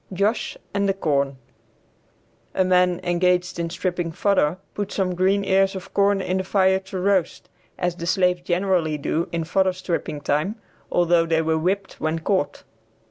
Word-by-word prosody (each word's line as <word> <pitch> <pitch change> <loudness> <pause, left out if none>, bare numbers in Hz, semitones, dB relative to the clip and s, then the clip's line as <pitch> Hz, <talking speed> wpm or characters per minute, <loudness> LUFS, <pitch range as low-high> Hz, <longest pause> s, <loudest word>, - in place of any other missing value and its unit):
JOSH 200 +5 0 0.2
AND 200 0 +1
THE 195 - +1
CORN. 140 -6 0 1.2
A 185 - +3
man 180 -1 +3
engaged 180 0 +1
in 170 0 -1
stripping 175 -1 -2
fodder 180 -2 +1 0.2
put 205 -1 -4
some 185 -2 0
green 190 +3 +2
ears 195 +1 +3
of 190 - -8
corn 200 0 +3
in 185 0 -1
the 190 - -1
fire 190 0 +3
to 190 0 -8
roast 190 -2 0 0.3
as 180 -1 -1
the 170 -1 -6
slaves 180 -1 +2
generally 175 -3 0
do 160 +3 -2
in 170 -1 -1
fodder 185 +3 +1
stripping 175 -4 -3
time, 150 +9 0 0.4
although 175 -1 +3
they 160 0 +2
were 160 0 +1
whipped 195 +4 -2
when 155 +1 0
caught. 160 -3 -1
180 Hz, 165 wpm, -23 LUFS, 165-190 Hz, 1.2 s, A